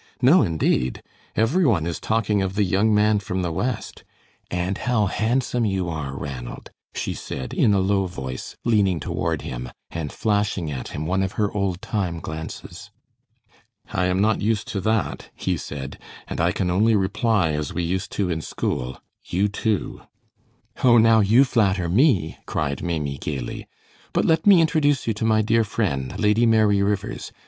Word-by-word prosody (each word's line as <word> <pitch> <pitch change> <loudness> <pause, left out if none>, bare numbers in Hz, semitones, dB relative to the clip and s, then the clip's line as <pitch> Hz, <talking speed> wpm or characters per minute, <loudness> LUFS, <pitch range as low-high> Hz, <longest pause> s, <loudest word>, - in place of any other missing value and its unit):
"No, 140 +9 +6
indeed. 80 -7 0 0.3
Every 130 +13 +2
one 100 - +2
is 85 -1 -3
talking 110 -2 +1
of 95 0 -2
the 105 - +3
young 100 +4 +2
man 105 0 +3
from 95 -1 -3
the 85 - -1
West. 120 +9 -3 0.5
And 90 +2 -2
how 120 -4 +1
handsome 120 +4 0
you 95 -5 0
are, 70 -4 -4
Ranald," 65 -4 -7 0.2
she - - -2
said, 65 -1 -6
in 105 - +3
a - - +3
low 95 0 +1
voice, 65 -7 -6
leaning 100 -7 +3
toward - - -2
him, 60 0 -5 0.2
and 80 -3 -4
flashing 100 -7 0
at 65 -3 -5
him 75 - -5
one 95 +3 0
of 95 0 -2
her 105 -2 0
old 100 -3 -2
time 90 -6 -2
glances. 80 +5 -7 1.0
"I 95 -2 +1
am 90 +1 +1
not 110 +1 +2
used 105 0 0
to 100 - -2
that," 110 +2 -1
he - - -1
said, 70 -1 -7 0.3
"and - - -3
I 85 +1 +3
can 90 -2 -1
only 110 +5 +3
reply 100 -2 +1
as 75 -1 -2
we 90 - -2
used 95 +3 -2
to 100 - 0
in 80 -1 -2
school, 65 -3 -3 0.2
'You, 100 +4 0
too.'" 105 0 -2 0.8
"Oh, 120 -2 +7
now 115 0 +6
you 110 +6 +5
flatter 100 -8 +1
me," 95 - +2
cried 70 -2 -2
Maimie, 75 -6 -2
gayly; 65 -5 -5 0.5
"but - - +2
let 160 +3 +2
me 190 -4 +8
introduce 145 -4 +2
you 115 - 0
to 105 +2 -3
my 110 -1 +3
dear 115 +1 +3
friend, 90 - -2
Lady 105 +3 +3
Mary 110 -3 +4
Rivers. 100 0 -2
100 Hz, 175 wpm, -23 LUFS, 85-110 Hz, 1.0 s, me